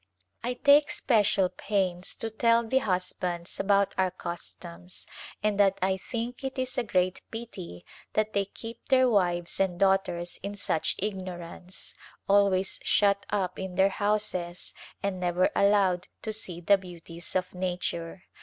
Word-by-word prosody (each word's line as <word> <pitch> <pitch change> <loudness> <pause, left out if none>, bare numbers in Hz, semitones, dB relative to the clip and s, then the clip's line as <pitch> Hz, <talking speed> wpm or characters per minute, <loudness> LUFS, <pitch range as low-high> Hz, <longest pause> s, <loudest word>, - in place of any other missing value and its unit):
I 245 +1 -1
take 285 +3 +5
special 205 -5 +3
pains 185 -2 -1
to 225 - -4
tell 230 +1 +3
the 265 +4 +3
husbands 180 -4 -2
about 200 0 +3
our 190 -1 +3
customs, 175 0 -7 0.4
and 210 -1 +1
that 195 -1 +4
1 190 0 +1
think 240 +5 -5
it 265 0 -4 0.2
a - - +2
great 185 -4 +1
pity 185 - -8 0.3
that 215 0 +1
they 200 -1 +2
keep 225 +4 -9
their 260 -1 +5
wives 175 -6 +1
and 185 -2 +1
daughters 190 -3 +1
in 200 +1 -5
such 165 -5 0
ignorance, 185 -2 -6 0.3
always 195 -1 +3
shut 200 -1 +3
up 190 -3 -1
in 190 -1 -5
their 190 +2 +5
houses 205 -4 -1 0.3
and 195 -2 -1
never 180 0 +2
allowed 195 -3 +3 0.2
to 220 - -2
see 180 -5 -5
the 200 +3 +5
beauties 170 -2 -8
of 185 -1 0
nature. 180 -1 -3
190 Hz, 145 wpm, -28 LUFS, 180-210 Hz, 0.4 s, take